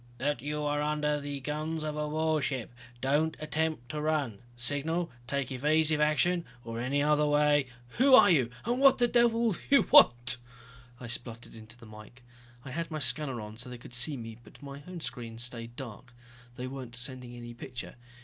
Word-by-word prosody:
"... - - -25
That 140 -1 -1
you 150 +2 -3
are 145 0 0
under 150 0 0
the 140 -1 -5
guns 155 +3 -3
of 155 -1 -3
a 150 0 -2
warship! 150 -6 -1 0.3
Don't 150 +4 +1
attempt 155 -4 -2
to 150 -1 -4
run, 150 -9 -1 0.2
signal, 145 +7 -1 0.2
take 140 -1 -2
evasive 150 +3 +2
action, 155 +4 +2 0.2
or 115 0 -5
in 120 - -2
any 145 +2 +1
other 150 0 +3
way...." 145 -1 +3 0.3
"Who 265 +1 +7
are 205 -6 +7
you 130 -8 +3 0.2
and 240 +3 0
what 275 -1 +6
the 240 - +3
devil 235 -1 +3
do 180 - -4
you 280 - +6
want?" 120 +1 +6 0.6
I 125 - -8
spluttered 115 0 -5
into 110 +1 -11
the 120 - -14
mike. 110 +3 -13 0.4
I 130 - -7
had 165 +4 -3
my 155 - -4
scanner 135 -1 +2
on, 105 +1 -9
so 120 +2 -3
they 125 - -7
could 120 - -13
see 130 +4 +2
me, 115 -1 -8
but 110 - -17
my 140 0 -8
own 180 -2 -7
screen 115 -6 -6
stayed 120 -1 -4
dark. 125 -1 -9 0.4
They 125 - -5
weren't 130 -2 -7
sending 125 0 -3
any 120 0 -8
picture. 120 +1 -8
145 Hz, 195 wpm, -30 LUFS, 120-155 Hz, 0.6 s, Who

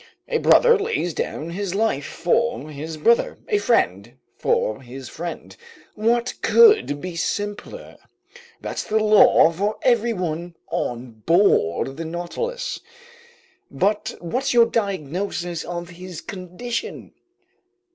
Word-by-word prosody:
A 470 - 0
brother 475 -3 +5
lays 405 - -1
down 160 +2 -4
his 195 +1 -3
life 200 -10 0
for 175 -1 -1
his 155 +2 -6
brother, 230 +10 +2
a 420 -3 +2
friend 120 - 0 0.2
for 110 +4 0
his 130 +1 -9
friend, 170 +6 -7 0.4
what 235 +3 +1
could 435 - +5
be 180 +2 -6
simpler? 205 - -4 0.6
That's - - -4
the 220 - 0
law 215 -6 +6
for 200 +6 -2
everyone 180 -9 0 0.2
on 120 -2 -4
board 140 - +2
the 165 - -4
Nautilus. 175 - -4 0.9
But 205 +2 -1
what's 250 +10 -2
your 235 -1 +7
diagnosis 185 -4 -2
of 175 0 -6
his 180 -1 -9
condition?" 200 - -6
180 Hz, 115 wpm, -22 LUFS, 160-230 Hz, 0.9 s, your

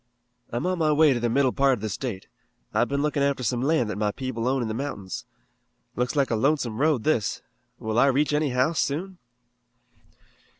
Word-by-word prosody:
"I'm 120 +8 -3
on 185 -1 0
my 155 -1 +3
way 150 -1 +5
to 120 - -1
the 120 0 0
middle 130 +2 +2
part 135 +1 +3
of 120 - -3
the 110 - -2
state. 105 -1 -4 0.5
I've 115 +3 +2
been 140 +1 -1
looking 150 -1 0
after 140 -2 +1
some 120 +1 0
land 140 -3 +2
that 105 - -5
my 105 -1 +1
people 125 -1 -4
own 130 -1 +1
in - - -2
the 110 - -3
mountains. 110 -7 -5 0.7
Looks 125 +4 -1
like 140 -4 +1
a - - +2
lonesome 130 -2 0
road, 150 -7 +2
this. 135 -9 0 0.3
Will 110 +1 -1
I 135 - +5
reach 145 +3 +2
any 150 0 +1
house 130 +6 +1
soon?" 180 +6 -2
130 Hz, 205 wpm, -25 LUFS, 115-150 Hz, 0.7 s, way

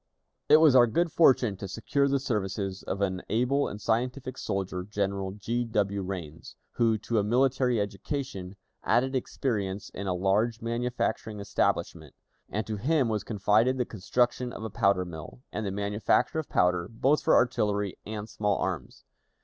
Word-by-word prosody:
It 155 - +9
was 155 -4 +6
our 120 -2 +7
good 170 +9 +1
fortune 125 - +4
to 100 - -6
secure 140 +8 0
the 140 0 +1
services 100 -5 -2
of 100 - -4
an 95 -2 0
able 125 +5 +1
and 105 - -6
scientific 125 +4 -1
soldier, 95 -5 -3
General 100 -1 -2
G. 115 +4 -2
W. 100 -3 -1
Rains, 90 -5 -7 0.2
who, 115 -2 +2
to 110 +1 -1
a - - +1
military 125 +1 +2
education, 100 -1 -4 0.3
added 130 +2 +2
experience 105 -6 -2
in 100 +1 -6
a 90 - 0
large 105 +5 +1
manufacturing 115 -2 -2
establishment, 100 - -1 0.3
and 105 +1 -2
to 110 -1 -4
him 135 +2 +1
was 105 -2 -1
confided 110 +4 +2
the 125 - 0
construction 120 +4 0
of - - -8
a 110 - -5
powder 100 -2 +2
mill, 85 - -9
and 110 -1 -3
the - - -2
manufacture 100 +9 +1
of 155 - -5
powder, 90 -1 +2
both 135 +6 +2
for - - +4
artillery 105 -5 +1
and 105 0 -6
small 105 -2 0
arms. 90 -8 -4
110 Hz, 165 wpm, -28 LUFS, 100-125 Hz, 0.3 s, It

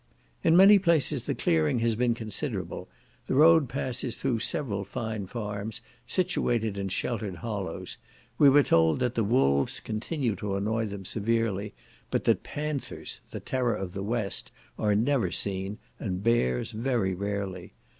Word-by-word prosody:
In 165 +1 +5
many 200 +2 +8
places 170 -7 +2
the - - 0
clearing 80 +2 +2
has 115 -1 +1
been 120 0 +1
considerable; 110 - -4 0.4
the - - 0
road 160 -2 +6
passes 125 -1 -2
through 125 -4 -1
several 110 -5 -1
fine 110 -1 -4
farms, 105 -1 -5 0.3
situated 120 - 0
in 100 -1 -3
the - - -6
sheltered 105 -2 -2
hollows; 100 -3 -5 0.4
we 145 - +8
were 145 +1 +6
told 80 -6 +3
that 125 -1 0
the 115 - +1
wolves 70 - +2
continue 115 +1 -2
to 100 0 -3
annoy 110 +3 -1
them 100 -1 -7
severely, 105 -1 -1 0.3
but - - 0
that - - +2
panthers, 150 -2 -4
the - - -6
terror 125 -3 -1
of 95 -2 -5
the 95 - -5
West, 105 -1 -1 0.3
are 105 -1 +2
never 120 +3 +2
seen, 95 +1 -1 0.2
and 95 -2 -3
bears 65 - +1
very 115 -4 0
rarely. 95 -2 -4
110 Hz, 155 wpm, -28 LUFS, 100-125 Hz, 0.4 s, many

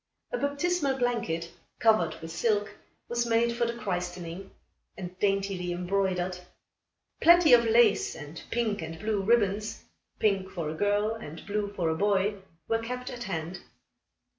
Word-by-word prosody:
A - - -1
baptismal 285 0 0
blanket, 230 -10 -1 0.3
covered 200 -8 +3
with 165 - -6
silk, 205 +2 0 0.3
was 240 0 0
made 235 +1 +2
for 235 0 +1
the 235 - -3
christening, 180 -2 -4 0.5
and 180 -1 -7
daintily 195 -3 0
embroidered. 180 0 -1 0.8
Plenty 340 -4 +7
of 235 -1 +7
lace, 225 -2 +4
and 150 +1 -9
pink 225 -4 0
and 160 0 -6
blue 210 +2 -1
ribbons 210 -1 +1 0.3
pink 195 -3 +1
for 165 -5 -4
a - - -4
girl 205 +5 +1
and 165 -8 -9
blue 205 0 -2
for 175 -4 0
a 160 - 0
boy 200 +2 +1 0.3
were 225 - +1
kept 250 +2 -5
at 240 -1 -6
hand. 170 0 -4
205 Hz, 145 wpm, -28 LUFS, 180-235 Hz, 0.8 s, Plenty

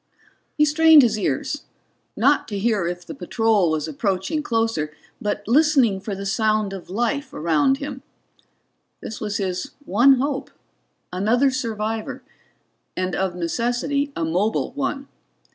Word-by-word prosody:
He 300 - +5
strained 315 0 +7
his 225 -3 +2
ears, 200 - -2 0.5
not 280 +5 +3
to 205 - -4
hear 205 -4 +1
if 175 0 -5
the - - -7
patrol 225 - +1
was 155 -1 -1
approaching 195 - -1
closer, 225 - -1 0.3
but 205 -1 -3
listening 265 -6 +4
for 205 0 -5
the 195 +1 -6
sound 215 0 +1
of 190 -3 -9
life 240 +8 -1
around 165 - +2
him. 280 -2 -6 1.0
This 220 - -7
was 210 -2 -2
his 190 +6 -3
one 240 +8 +5
hope 275 +1 -2 0.6
another 235 +9 +2
survivor, 225 -3 -3 0.7
and 185 0 -1
of 190 -2 -1
necessity 245 - -1
a 165 - -1
mobile 185 +7 0
one. 275 0 -3
220 Hz, 135 wpm, -22 LUFS, 190-275 Hz, 1.0 s, strained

